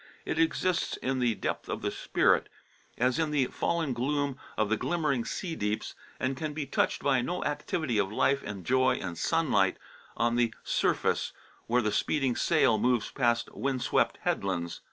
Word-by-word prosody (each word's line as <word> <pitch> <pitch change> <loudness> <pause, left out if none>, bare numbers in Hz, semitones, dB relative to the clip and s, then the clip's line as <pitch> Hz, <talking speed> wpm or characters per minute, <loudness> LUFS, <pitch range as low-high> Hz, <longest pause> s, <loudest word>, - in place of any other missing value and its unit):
It - - -2
exists 170 +2 +1
in 130 0 -1
the 120 -3 +2
depth - - -3
of - - -4
the - - 0
spirit, - - +2 0.5
as 125 +5 +2
in 160 -1 +1
the 145 -3 +2
fallen 160 +1 -1
gloom 140 +3 -1 0.2
of 110 - +2
the 110 - +3
glimmering 145 -4 0
sea 165 +6 -4
deeps, 105 -5 -2 0.3
and 130 - 0
it 135 - -6
can 155 -2 -3
be 150 -2 -2
touched - - 0
by 135 -3 +3
no 175 +8 -3
activity 145 -4 -1
of 95 -1 0
life 140 +5 +2
and 100 -4 -7
joy 130 0 +3
and 85 -3 -5
sunlight 105 - +2 0.4
on 120 0 +2
the 120 -2 +1
surface, - - +1 0.3
where 125 +1 +2
the 105 - +1
speeding 135 -1 +1
sail 110 -2 +3
moves 120 -1 +1
past 120 -3 +1
wind 135 -2 -1
swept - - +2
headlands. 85 -3 -1
130 Hz, 175 wpm, -29 LUFS, 115-150 Hz, 0.5 s, the